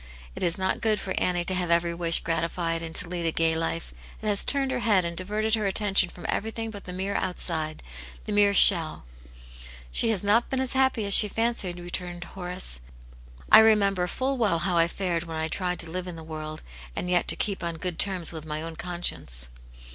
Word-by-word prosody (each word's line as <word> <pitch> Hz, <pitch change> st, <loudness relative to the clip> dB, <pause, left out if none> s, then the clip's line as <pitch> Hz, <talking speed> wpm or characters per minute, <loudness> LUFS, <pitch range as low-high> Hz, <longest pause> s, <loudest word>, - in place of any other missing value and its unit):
It -, -, -7 dB
is 170 Hz, -1 st, 0 dB
not 190 Hz, 0 st, -2 dB
good 215 Hz, -2 st, +1 dB
for 190 Hz, -, -5 dB
Annie 175 Hz, -1 st, -1 dB
to 185 Hz, -, -1 dB
have 180 Hz, -2 st, -2 dB
every 170 Hz, 0 st, +1 dB
wish 170 Hz, -1 st, +3 dB
grati 165 Hz, 0 st, -1 dB
fied, 165 Hz, -2 st, -3 dB
and 165 Hz, -1 st, -8 dB
to 200 Hz, -, +1 dB
lead 170 Hz, -1 st, -3 dB
a -, -, +1 dB
gay 160 Hz, 0 st, +1 dB
life. 165 Hz, +1 st, -4 dB, 0.3 s
It -, -, -11 dB
has 205 Hz, -2 st, +4 dB
turned 275 Hz, -2 st, 0 dB
her 255 Hz, -, -2 dB
head 205 Hz, -6 st, +2 dB
and 170 Hz, 0 st, -4 dB
diverted 210 Hz, +4 st, -2 dB
her 215 Hz, -3 st, +1 dB
attention 195 Hz, -2 st, +1 dB
from 175 Hz, -, -12 dB
everything 225 Hz, +1 st, -3 dB
but 205 Hz, -2 st, -11 dB
the 180 Hz, -, -8 dB
mere 190 Hz, +2 st, -4 dB
outside, 160 Hz, -5 st, +1 dB, 0.4 s
the -, -, -5 dB
mere 205 Hz, -1 st, +3 dB
shell." 165 Hz, -, +6 dB, 0.5 s
" -, -, -17 dB
She 225 Hz, -, +1 dB
has 205 Hz, -4 st, -1 dB
not 215 Hz, +4 st, +2 dB
been 265 Hz, -, -2 dB
as 260 Hz, 0 st, -2 dB
happy 265 Hz, -4 st, +1 dB
as 200 Hz, -, +4 dB
she 210 Hz, -, +9 dB
fancied," 225 Hz, -5 st, -2 dB
re 175 Hz, 0 st, -10 dB
turned 175 Hz, -1 st, -5 dB
Horace. 180 Hz, -, -1 dB, 0.4 s
" -, -, -21 dB
I 215 Hz, -, +10 dB
remember 200 Hz, -5 st, +3 dB
full 265 Hz, +7 st, -3 dB
well 210 Hz, -7 st, +1 dB
how 175 Hz, +2 st, -2 dB
I 165 Hz, 0 st, +4 dB
fared 175 Hz, -2 st, -3 dB
when 165 Hz, -1 st, -6 dB
I 160 Hz, 0 st, -2 dB
tried 180 Hz, +2 st, -3 dB
to 165 Hz, -2 st, -5 dB
live 185 Hz, +1 st, -5 dB
in 180 Hz, -, -7 dB
the 165 Hz, -, -10 dB
world, 155 Hz, -1 st, -8 dB, 0.3 s
and -, -, -3 dB
yet 180 Hz, -1 st, +1 dB
to -, -, +5 dB
keep 200 Hz, -3 st, -3 dB
on 170 Hz, -1 st, -4 dB
good 175 Hz, 0 st, -4 dB
terms 185 Hz, -4 st, +2 dB
with 160 Hz, -2 st, -7 dB
my 155 Hz, 0 st, -5 dB
own 165 Hz, -1 st, -7 dB
conscience." 170 Hz, -, -1 dB
180 Hz, 230 wpm, -25 LUFS, 165-205 Hz, 0.5 s, I